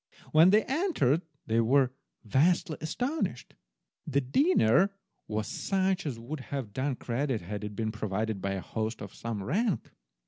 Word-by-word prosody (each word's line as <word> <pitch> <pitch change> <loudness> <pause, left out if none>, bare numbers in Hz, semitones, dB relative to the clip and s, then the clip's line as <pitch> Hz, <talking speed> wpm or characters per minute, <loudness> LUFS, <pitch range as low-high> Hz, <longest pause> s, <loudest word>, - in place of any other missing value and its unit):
When 160 +3 +7
they 210 +3 +5
entered 265 - +1 0.2
they 115 +1 +2
were 130 +3 +4 0.3
vastly 155 - +2
astonished. 195 - -2 0.5
The 140 - +2
dinner 175 - +4 0.4
was 105 0 -2
such 190 -2 0
as 130 -5 -3
would 125 +7 -6
have 130 -5 -5
done 130 +3 -1
credit 125 0 -2
had 105 +4 -5
it 105 -1 -5
been 110 +1 -1
provided 110 -1 -2
by 95 +1 -1
a 95 - -3
host 110 +2 -3
of 100 - -9
some 115 -4 -4
rank. 200 - 0
130 Hz, 150 wpm, -29 LUFS, 110-175 Hz, 0.5 s, When